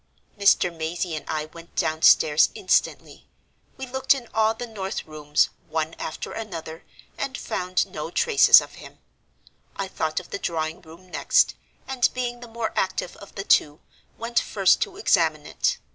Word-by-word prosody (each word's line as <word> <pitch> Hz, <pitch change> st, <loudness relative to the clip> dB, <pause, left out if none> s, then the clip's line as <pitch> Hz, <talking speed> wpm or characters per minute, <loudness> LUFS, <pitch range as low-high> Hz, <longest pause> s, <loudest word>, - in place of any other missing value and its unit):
"Mr. 200 Hz, -4 st, +3 dB
Mazey 165 Hz, +1 st, -3 dB
and 155 Hz, -, -8 dB
I 155 Hz, -1 st, -2 dB
went 165 Hz, +2 st, -14 dB
downstairs 160 Hz, -2 st, +4 dB
instantly. 185 Hz, -, -1 dB, 0.5 s
We 265 Hz, -, -5 dB
looked 265 Hz, +2 st, +2 dB
in 250 Hz, -3 st, -8 dB
all 220 Hz, 0 st, +2 dB
the 245 Hz, -, -5 dB
north 200 Hz, -4 st, -5 dB
rooms, 150 Hz, -1 st, 0 dB, 0.2 s
one 160 Hz, 0 st, -2 dB
after 155 Hz, -, -5 dB
another, 165 Hz, -7 st, -7 dB, 0.4 s
and 270 Hz, -1 st, -3 dB
found 185 Hz, 0 st, -1 dB
no 150 Hz, +1 st, -6 dB
traces 450 Hz, -, +6 dB
of -, -, -11 dB
him. -, -, -13 dB, 0.8 s
I 195 Hz, -, -3 dB
thought 160 Hz, -3 st, -2 dB
of 180 Hz, -, -14 dB
the -, -, -4 dB
drawing 160 Hz, -2 st, -3 dB
room 170 Hz, +3 st, -15 dB
next, -, -, +3 dB, 0.3 s
and, 260 Hz, -2 st, +2 dB
being 245 Hz, -1 st, -3 dB
the 240 Hz, -, -10 dB
more 230 Hz, -1 st, -4 dB
active 185 Hz, -1 st, -1 dB
of 200 Hz, -, -14 dB
the 195 Hz, -, -4 dB
two, 150 Hz, -5 st, +3 dB, 0.4 s
went 230 Hz, +1 st, 0 dB
first 195 Hz, -3 st, +2 dB
to 390 Hz, -2 st, -2 dB
examine 160 Hz, -, +2 dB
it. -, -, -1 dB
185 Hz, 160 wpm, -24 LUFS, 160-230 Hz, 0.8 s, traces